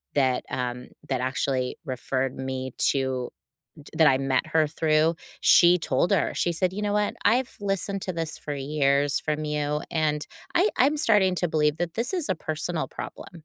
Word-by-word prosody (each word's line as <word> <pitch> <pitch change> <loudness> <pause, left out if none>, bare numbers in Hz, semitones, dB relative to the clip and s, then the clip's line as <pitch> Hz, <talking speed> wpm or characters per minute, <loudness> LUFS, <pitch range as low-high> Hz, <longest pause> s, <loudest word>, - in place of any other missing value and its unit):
that, 130 -3 +2
um, 125 0 -3 0.2
that 130 -2 -1
actually 130 0 -1
referred 130 0 -2
me 130 -1 -4 0.2
to 130 -2 -1 0.6
t - - -13
that 160 -2 +6
I 130 -1 +3
met 135 -1 +1
her 160 -1 +3
through, 155 +1 +2 0.3
she 175 0 +6
told 160 +3 0
her. 195 - +2
She 175 - 0
said, 180 +2 0
"You 205 +2 -4
know 205 0 0
what? 210 0 +1
I've 245 +3 +2
listened 195 0 -2
to 185 - -3
this 165 -2 -3
for 150 - -6
years 140 0 +1
from 155 0 -2
you, 150 0 -1
and 150 -2 0 0.3
I 370 +5 +4
I'm 280 +4 +3
starting 205 -9 +3
to 175 - +1
believe 150 -1 +1
that 175 -1 -3
this 230 +8 -1
is 350 -6 -1
a - - +1
personal 160 +2 -3
problem." 165 -3 -9
155 Hz, 185 wpm, -26 LUFS, 135-180 Hz, 0.6 s, that